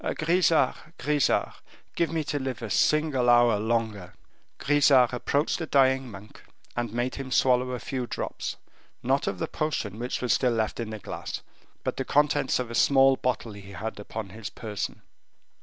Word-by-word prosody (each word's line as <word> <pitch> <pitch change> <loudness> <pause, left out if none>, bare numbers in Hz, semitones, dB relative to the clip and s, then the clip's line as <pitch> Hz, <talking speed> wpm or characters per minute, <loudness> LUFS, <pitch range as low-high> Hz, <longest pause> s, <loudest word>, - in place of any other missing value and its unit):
Grisart, 165 -2 +1
Grisart, 145 -2 +1 0.4
give 170 -1 0
me 160 -1 -1
to 145 0 -2
live 130 -3 -4
a 110 - -5
single 150 -4 +2
hour 120 -3 +5
longer." 110 -4 -2 0.4
Grisart 140 -4 +4
approached 140 +4 0
the 160 - -4
dying 130 -2 +3
monk, 105 0 -12 0.3
and 120 -2 -2
made 120 +2 -1
him 135 -1 -6
swallow 125 -1 +3
a 125 -1 -3
few 130 -3 -4
drops, - - -4 0.5
not 135 +3 +1
of - - -1
the 165 - -2
potion 115 - -3
which 125 +1 -3
was 125 - +1
still 125 -2 +2
left 110 0 -1
in 115 -2 -3
the 110 - -5
glass, 105 - -6 0.4
but - - 0
of - - -33
the 135 - -2
contents 145 -1 +3
of 125 -2 -4
a - - -5
small 135 +2 +5
bottle 125 -3 -2
he 100 -1 -11
had 110 +3 -5
upon 105 0 -6
his 105 0 -7
person. 105 -3 -5
125 Hz, 175 wpm, -27 LUFS, 110-140 Hz, 0.5 s, hour